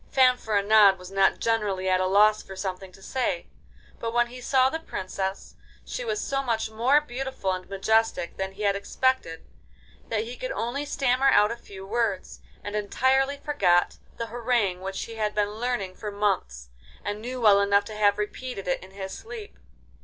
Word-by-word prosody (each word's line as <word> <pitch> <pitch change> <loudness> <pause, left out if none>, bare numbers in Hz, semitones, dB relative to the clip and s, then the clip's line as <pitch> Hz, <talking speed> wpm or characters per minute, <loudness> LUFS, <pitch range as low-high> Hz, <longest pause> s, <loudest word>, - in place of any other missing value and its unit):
Fanfaronade 215 -6 +5
was 180 0 -11
not 195 0 +3
generally 210 -5 0
at 185 0 +3
a 185 - +1
loss 210 +2 +5
for 190 - -10
something 190 0 -5
to 195 +1 -17
say, 265 - -1 0.5
but 230 - -3
when 240 0 +4
he 250 +1 -10
saw 260 +1 +3
the 320 +4 -2
Princess, 190 -8 -5 0.3
she - - -4
was 435 -3 -2
so 275 -6 -1
much 230 -4 -1
more 245 +7 +4
beautiful 265 -7 -4
and 185 0 -5
majestic 220 -1 +1
than 190 0 -4
he 205 +2 -7
had 200 -1 +2
expected 200 -4 -1 0.6
that 220 -1 0
he 240 +2 -7
could - - -4
only 280 - -2
stammer 270 -1 +2
out 210 -3 +5
a - - -2
few 195 -4 -11
words, 215 -2 -2 0.2
and 205 0 -5
entirely 265 +6 +1
forgot 230 -13 +2 0.2
the 230 - -3
harangue 230 -5 0
which 195 0 -4
he 225 -1 -8
had 210 -1 -1
been 205 -1 +1
learning 240 -6 -2
for 210 +3 -6
months, 65 - -1 0.4
and 205 +1 -3
knew 250 +2 -5
well 205 -4 +6
enough 200 0 +3
to 215 - -8
have 205 -1 +3
repeated 210 -1 -5
it 180 - -1
in 185 - -12
his 190 0 -7
sleep. 445 -2 -9
215 Hz, 185 wpm, -26 LUFS, 195-250 Hz, 0.6 s, well